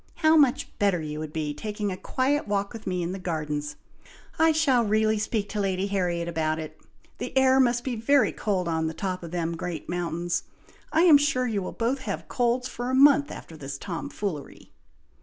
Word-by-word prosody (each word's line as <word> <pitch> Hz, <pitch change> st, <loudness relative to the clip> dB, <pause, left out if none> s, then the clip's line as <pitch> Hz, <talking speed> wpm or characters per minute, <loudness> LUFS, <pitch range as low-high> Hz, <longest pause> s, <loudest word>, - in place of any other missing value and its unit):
How 315 Hz, -1 st, +4 dB
much 280 Hz, -5 st, +3 dB
better 200 Hz, -4 st, +2 dB
you 150 Hz, -1 st, -5 dB
would 155 Hz, -1 st, -5 dB
be 150 Hz, -2 st, -2 dB
taking 210 Hz, +2 st, -3 dB
a -, -, -3 dB
quiet 265 Hz, +8 st, -1 dB
walk 200 Hz, 0 st, -1 dB
with 225 Hz, -2 st, -9 dB
me 180 Hz, -1 st, -1 dB
in 170 Hz, -, -2 dB
the 190 Hz, -, -5 dB
gardens! 150 Hz, -4 st, -3 dB, 0.6 s
I 320 Hz, 0 st, +5 dB
shall 285 Hz, -6 st, +3 dB
really 215 Hz, 0 st, +2 dB
speak 210 Hz, -1 st, -1 dB
to 210 Hz, -, -3 dB
Lady 190 Hz, -1 st, 0 dB
Harriet 180 Hz, -4 st, -1 dB
about 160 Hz, -2 st, -1 dB
it! 155 Hz, -1 st, -8 dB, 0.4 s
The -, -, -4 dB
air 265 Hz, 0 st, +5 dB
must 240 Hz, -2 st, +3 dB
be 255 Hz, -3 st, -2 dB
very 265 Hz, +5 st, +3 dB
cold 190 Hz, -4 st, -1 dB
on 160 Hz, -1 st, 0 dB
the 160 Hz, -, -4 dB
top 185 Hz, -1 st, -3 dB
of 170 Hz, -, -7 dB
them 170 Hz, -1 st, -2 dB
great 165 Hz, -2 st, -5 dB
mountains! 175 Hz, 0 st, -2 dB, 0.5 s
I 320 Hz, -, +4 dB
am 315 Hz, -5 st, +8 dB
sure 270 Hz, -3 st, +1 dB
you 215 Hz, -5 st, -1 dB
will 185 Hz, -, -4 dB
both 240 Hz, +4 st, -1 dB
have 190 Hz, -10 st, -5 dB
colds 245 Hz, +3 st, 0 dB
for 245 Hz, 0 st, -5 dB
a 260 Hz, -, +1 dB
month 285 Hz, +1 st, +6 dB
after 165 Hz, -, -9 dB
this 140 Hz, -2 st, -6 dB
Tom 170 Hz, +2 st, -5 dB
foolery." 165 Hz, -9 st, -6 dB
200 Hz, 205 wpm, -26 LUFS, 170-250 Hz, 0.6 s, am